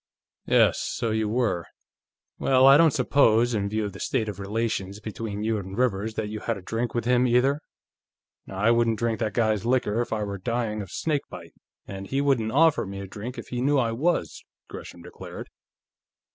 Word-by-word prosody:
"Yes; - - +4
so 115 -2 -2
you 110 -1 0
were. 110 -7 0 0.7
Well, 130 -1 +4
I 135 +1 +9
don't 165 +2 +6
suppose, 120 -5 +3
in 100 -2 -1
view 110 0 -1
of 100 - -5
the - - -10
state 115 -5 -1
of 105 -3 -6
relations 100 -1 -2
between 105 -1 -5
you 110 -1 0
and 95 +1 -8
Rivers, 110 -3 0
that 110 - -2
you 105 +1 -5
had 115 0 -2
a - - -9
drink 115 +4 -3
with 120 - -1
him, 125 +1 +3
either?" 130 +5 +2 0.9
"I 100 +4 +2
wouldn't 115 -1 +2
drink 115 0 -1
that 110 -3 -2
guy's 110 -3 +1
liquor 120 -2 +1
if 120 - -4
I 110 -1 -1
were 100 -1 -5
dying 110 +1 -2
of 95 - -8
snakebite, 150 - -4 0.3
and 95 0 -7
he 135 - -1
wouldn't 135 -6 +1
offer 155 -3 +3
me 100 0 -6
a 100 - -6
drink 105 +6 -7
if - - -8
he 125 -1 -3
knew 145 +2 +2
I 120 -4 +1
was," 160 +10 -1 0.2
Gresham 85 - -10
declared. 90 - -9
115 Hz, 195 wpm, -25 LUFS, 105-125 Hz, 0.9 s, I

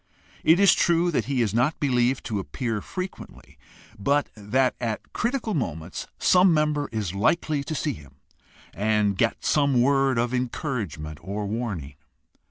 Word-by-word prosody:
It 165 +3 +5
is 200 -1 +7
true 175 0 +2
that 150 - 0
he 135 -3 +1
is 105 -3 -1
not 125 +7 +1
believed 125 -2 +1
to 105 -4 -2
appear 115 +2 -3
frequently, 185 - -8 0.4
but 140 +8 +1
that 110 +5 +1
at 115 -3 -4
critical 235 -2 -1
moments 85 - -4
some 185 0 +5
member 150 -2 +1
is 105 -5 -3
likely 145 +8 +1
to 155 - -4
see 150 -1 -1
him 75 - -14 0.6
and 105 -1 +1
get 115 +4 0
some 140 -4 +3
word 135 0 +3
of 120 +1 0
encouragement 115 - -3
or 100 +4 -4
warning. 100 - -4
125 Hz, 150 wpm, -25 LUFS, 105-150 Hz, 0.6 s, is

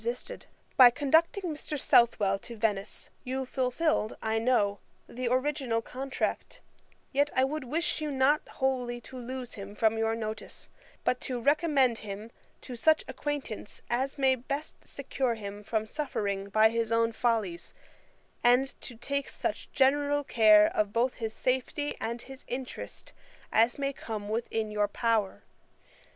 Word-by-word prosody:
] - - -28
'By 255 -2 +11
conducting 320 +9 +2
Mr. 300 -3 -4
Southwell 205 -6 +4
to 235 +2 -10
Venice, 210 -2 -1
you 260 +1 -2
fulfilled, 260 -1 0
I 220 0 0
know, 215 -4 +2 0.3
the 250 0 -4
original 255 -2 0
contract: 265 +3 -3 0.5
yet 285 +2 +3
I 260 - +4
would 290 +1 -2
wish 315 +5 -1
you 305 - -1
not 280 +2 +3
wholly 250 -3 -1
to 255 - -10
lose 250 0 -6
him 200 0 -8
from 225 +1 +2
your 225 0 +1
notice, 220 -1 -6 0.3
but 250 - +1
to 250 -2 -3
recommend 280 -3 +3
him 210 +2 -7 0.3
to 250 - -7
such 315 +7 +3
acquaintance 285 -8 -5
as 265 +4 0
may 265 -1 +4
best 280 +4 -5
secure 265 -3 -2
him 205 -1 -7
from 220 +1 -1
suffering 200 -8 -3
by 220 +2 +5
his 230 0 -1
own 230 0 +3
follies, 220 -7 -1 0.7
and 250 +3 +5
to 245 - -7
take 280 +4 -2
such - - -4
general 290 +2 +3
care 215 -4 +6 0.2
both 235 +5 +1
of - - -23
his 220 -1 -3
safety 260 +3 -1
and 235 +1 -3
his 270 0 -11
interest 255 +1 -6 0.4
as 230 +2 +4
may 280 0 -1
come 215 -5 -6
within 220 -1 -2
your 210 -1 +1
power. 220 -1 0
245 Hz, 145 wpm, -29 LUFS, 220-270 Hz, 0.7 s, By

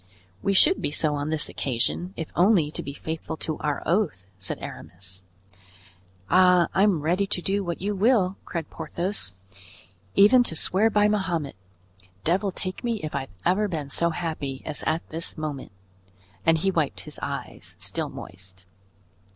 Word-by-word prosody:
"We 195 - +1
should 315 - +5
be - - 0
so 150 +1 +1
on 145 +1 -2
this 155 -1 +1
occasion, 140 +9 -1
if 160 - -5
only 175 -4 +4
to - - -4
be 140 - -6
faithful 160 +2 -5
to 155 -1 -2
our 150 -1 -1
oath," 165 - +1
said 95 +1 -5
Aramis. 90 +2 -7 1.0
"Ah, 180 -1 +5
I'm 190 -4 +3
ready 180 +6 +1
to 195 - 0
do 195 +3 0
what 170 -2 -4
you 205 +2 0
will," 200 -2 +3
cried 165 -3 -5
Porthos; 165 - -2 0.8
"even 210 +6 +7
to 165 - -4
swear 195 +7 +3
by 210 -1 +4
Mahomet. 180 -9 -1 0.7
Devil 190 - +2
take 185 +3 -5
me 235 -3 0
if 155 - -4
I've 135 -1 -3 0.2
ever 205 +4 +3
been 155 -7 -4
so 170 +4 +4
happy 155 -5 -4
as 155 - -3
at 160 +2 0
this 165 +2 -5
moment." 150 -6 -4 0.8
And 165 0 +6
he 195 +4 +1
wiped 155 -6 0
his - - -9
eyes, - - -5
still - - -2
moist. 95 0 -10
165 Hz, 160 wpm, -26 LUFS, 150-195 Hz, 1.0 s, even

